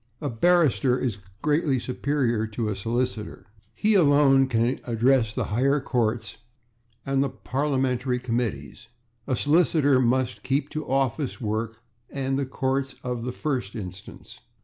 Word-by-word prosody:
A 145 - -3
barrister 140 -2 +3
is 115 -6 -2 0.2
greatly 150 -2 +2
superior 125 -2 -1
to 110 0 -3
a 105 - -2
solicitor. 115 +1 -3 0.3
He 215 - +2
alone 145 -6 +5
can 120 0 0
address 120 0 +2
the - - 0
higher 135 +5 +2
courts 115 -4 -1 0.7
and 135 0 +1
the 140 - -1
parliamentary 130 -1 -1
committees; 115 - -3 0.4
a 130 - +1
solicitor 145 -1 +3
must 130 +1 0
keep 140 +2 -1
to 155 0 -5
office 135 +1 0
work 110 0 -3 0.3
and 135 0 -2
the 140 - -2
courts 135 0 -2
of 125 0 -3
first 125 -8 -3
instance. 95 -3 -9
130 Hz, 130 wpm, -25 LUFS, 115-140 Hz, 0.7 s, alone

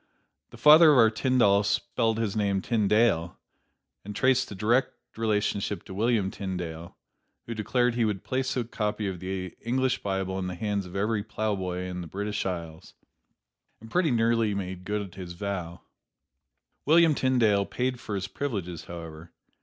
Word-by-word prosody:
The - - -13
father 155 +1 +8
of 145 - +4
our 115 -2 +6
Tyndall 110 -4 +3
spelled 110 +2 0
his 115 -3 -1
name 100 -2 +1
Tyndale, 105 -5 +1 0.7
and 105 +1 -8
traced 130 +1 +2
a - - -6
direct 115 +7 +1 0.2
relationship 105 -2 -1
to 95 - -10
William 105 -1 +1
Tyndale, 85 -4 -6 0.5
who 115 - -5
declared 120 +3 +1
he 120 0 +1
would 105 -3 -1
place 130 0 -2
a 125 - +1
copy 105 -2 -2
of 95 -2 -4
the 95 0 -5
English 130 +2 0
Bible 95 -1 -2
in 90 - -3
the 90 - -4
hands 100 0 -2
of 90 - -11
every 105 +1 0
plowboy 100 -4 -2
in 90 -1 -5
the 85 - -7
British 100 +4 -3
Isles, 85 -3 -6 0.8
and 115 +1 -13
pretty 180 -3 +2
nearly 115 -3 +2
made 95 -2 -5
good 105 -3 -3
his 90 -2 -8
vow. 90 -2 -5 1.0
William 160 +1 +5
Tyndale 115 -8 +2
paid 125 0 -2
for 105 - -5
his 95 0 -3
privileges, 100 - -4
however. 85 -1 -9
105 Hz, 160 wpm, -27 LUFS, 95-115 Hz, 1.0 s, father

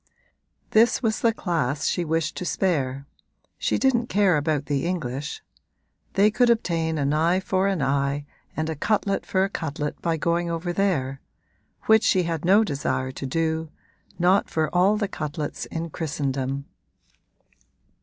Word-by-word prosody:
This 230 +4 +4
was 220 -1 +1
the 230 - +3
class 155 - -1
she 175 - +1
wished 160 0 -1
to - - -3
spare 140 -8 -1 0.5
she - - +1
didn't 245 -3 +2
care 195 -3 +3
about 150 -1 0
the 140 +2 -1
English. 150 -5 -4 0.7
They 205 +2 +4
could 245 +2 +3
obtain 165 -8 +1
an 140 0 +1
eye 165 +4 +2
for 190 0 0
an 190 -7 0
eye 140 +1 0 0.3
and 155 0 -1
a 160 - -2
cutlet 200 +4 0
for 190 0 +2
a 195 - 0
cutlet 150 -5 -4
by 165 -1 0
going 170 +2 0
over 170 +1 -2
there; 140 -9 0 0.6
which 220 0 +5
she 185 -3 +3
had 165 -2 -3
no 195 +5 +5
desire 130 -6 -2
to 135 - -6
do 160 +2 -1 0.5
not 180 +3 +3
for 160 -1 -1
all 195 +4 +4
the 205 -1 -1
cutlets 150 -4 -4
in 165 0 -5
Christendom! 140 -3 -2
165 Hz, 155 wpm, -24 LUFS, 145-190 Hz, 0.7 s, which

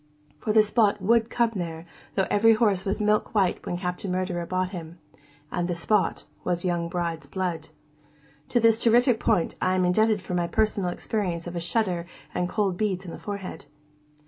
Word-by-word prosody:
For, 215 - -1
the 215 0 +6
spot 210 -1 +2
would 225 +4 +3
come 235 -1 +1
there, 165 -2 -5 0.3
though 190 - +2
every 225 +2 +5
horse 205 -4 +2
was 195 +2 -1
milk 210 +1 +1
white 195 -4 +2
when 175 - -2
Captain 180 +1 -3
Murderer 180 -2 -2
bought 185 0 -1
him. 170 -2 -8 0.5
And 175 - -1
the 175 - -1
spot 200 +5 0 0.2
was 175 0 -1
young 170 -1 0
bride's 170 -4 -3
blood. 170 -1 -3 0.8
(To 240 - +3
this 225 -1 +4
terrific 240 0 +4
point 170 - +1
I 185 0 +2
am 185 -1 +2
indebted 215 +4 +3
for 185 - -6
my 175 -1 +1
first - - -17
personal 210 -4 +2
experience 175 -2 -2
of 175 0 -6
a - - -1
shudder 175 -1 -1 0.3
and 180 0 -1
cold 195 -4 0
beads 195 -3 -1
on 175 - -7
the - - -8
forehead.) 200 -7 -6
185 Hz, 190 wpm, -26 LUFS, 175-215 Hz, 0.8 s, the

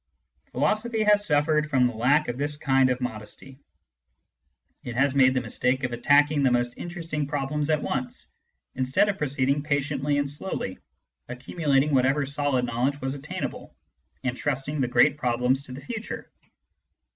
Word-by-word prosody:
Philosophy 220 +1 0
has 210 -1 +4
suffered 150 0 +2
from 130 -4 +3
the 125 - 0
lack 135 +7 +2
of 120 - -2
this 145 +2 -2
kind 135 -2 +3
of 125 0 0
modesty. 125 +3 -7 1.2
It 120 - -6
has 140 +1 +2
made 130 -1 +4
the 130 - +1
mistake 125 +3 -1
of 125 -1 -2
attacking 145 +4 +3
the 120 -2 +2
interesting 165 -4 -4
problems 145 +1 -2
at 155 -1 +1
once, 125 - -4 0.5
instead 130 +10 +1
of 195 - -2
proceeding 140 0 0
patiently 145 -1 -1
and 145 0 0
slowly, 145 - -5 0.5
accumulating 140 +3 0
whatever 135 +2 +3
solid 140 -2 0
knowledge 125 +4 -1
was 135 0 -2
obtainable, 145 +1 -6 0.5
and 125 -1 -1
trusting 140 +2 -2
the 125 - +1
great 145 +3 +4
problems 125 +1 +1
to 140 - -11
the 130 +2 -8
future. 225 -2 -6
140 Hz, 150 wpm, -26 LUFS, 130-150 Hz, 1.2 s, has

